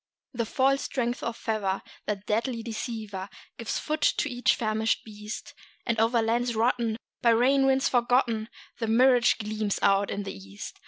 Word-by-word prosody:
The 235 -2 -2
false 275 +3 +2
strength 245 -2 -2
of 235 0 -3
fever, 200 -4 -1 0.2
that 205 -1 -3
deadly 230 +2 -1
deceiver, 215 -4 -5 0.3
Gives 230 - -2
foot 310 0 -3
to - - +2
each 245 -2 +2
famishing 220 -1 0
beast; 210 0 -8 0.3
And 230 -3 0
over 225 +1 +3
lands 235 +1 0
rotten, 230 -1 +1 0.2
by 235 - +4
rain 265 +4 +4
winds 265 0 +3
forgotten, 240 -2 +2 0.3
The 225 - -1
mirage 245 +1 +5
gleams 215 -1 -2
out 195 0 +3
in 200 - -3
the 195 - -5
east. 95 +1 -9
230 Hz, 160 wpm, -27 LUFS, 215-245 Hz, 0.3 s, mirage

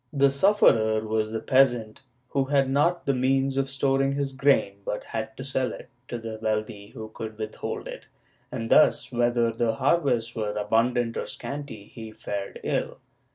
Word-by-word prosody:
The 140 -2 +3
sufferer 115 - +4
was 110 0 0
the 110 - -2
peasant, 120 -5 +2 0.3
who 135 -1 0
had 135 -1 +2
not 170 +5 +2
the 140 - +2
means 135 +1 +1
of 135 0 0
storing 135 0 +1
his 140 -1 -2
grain 135 -7 +2
but 105 - -3
had 115 +4 -5
to 130 - -6
sell 130 -1 -1
it - - -11 0.2
to 120 - -4
the 115 -1 -7
wealthy 110 -1 -2
who 110 0 -9
could 110 0 -7
withhold 110 -1 -5
it, - - -9 0.4
and 115 -2 -4
thus, 155 - +4
whether 120 -1 +2
the 115 0 0
harvests 120 -7 +1
were 105 -2 -2
abundant 115 +3 +1
or - - -3
scanty 140 -7 -6
he 110 0 -10
fared 100 -2 -5
ill. - - -2
120 Hz, 170 wpm, -26 LUFS, 110-135 Hz, 0.4 s, sufferer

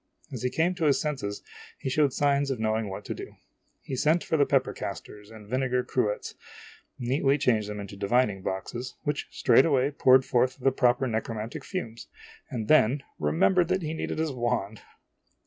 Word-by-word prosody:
As - - -6
he 125 - 0
came 165 +7 +1
to 175 -3 -2
his 145 -2 +3
senses, 130 -10 -3 0.3
he - - -6
showed 145 +2 +3
siijns 140 +1 +1
of 130 -4 -2
knowing 110 -1 0
what 95 - -7
to - - -3
do. - - -9 0.5
He - - -7
<_> - - +1
O - - 0
sent 160 +3 +3
for - - -1
the 145 -2 +3
pepper 135 -2 +1
casters 105 +1 -7
and 110 -2 -13
vinegar 125 +1 0
cruets, 105 -6 -1 0.6
neatly 135 +3 +1
changed 110 -6 +1
them 105 0 -5
into 100 0 -8
divining 100 0 +1
boxes, 110 +7 -5
which 145 -1 -2
straightway 135 +2 +3
poured 130 -2 +5
forth 130 0 +1
the 135 +1 +3
proper 125 0 +2
necromantic 110 -1 -4
fumes, 115 - -6 0.4
and 110 -4 -4
then 140 -2 +4 0.2
remembered 120 - +3
that 185 0 0
he 155 0 -3
needed 160 - -4
his 160 -1 -1
wand 120 -4 -2
125 Hz, 180 wpm, -27 LUFS, 110-140 Hz, 0.6 s, poured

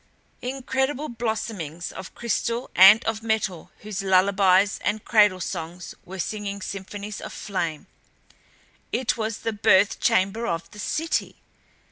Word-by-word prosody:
Incredible 265 +3 -2
blossomings 220 -8 -4
of 190 0 -9
crystal 235 +1 -2
and 195 +4 +8
of 220 0 -1
metal 215 -6 -2
whose 210 -2 -4
lullabies 195 +1 +3
and 210 0 -1
cradle 205 -5 +4
songs 175 +1 -5
were 190 +2 -8
singing 200 +2 -3
symphonies 200 +2 -6
of - - -7
flame. 170 -6 -3 1.1
It 255 - 0
was 220 -2 -3
the 225 - -2
birth 205 -1 +3
chamber 225 +1 +1
of 165 0 -3
the 210 - -12
City! 325 +10 -1
205 Hz, 125 wpm, -24 LUFS, 190-225 Hz, 1.1 s, and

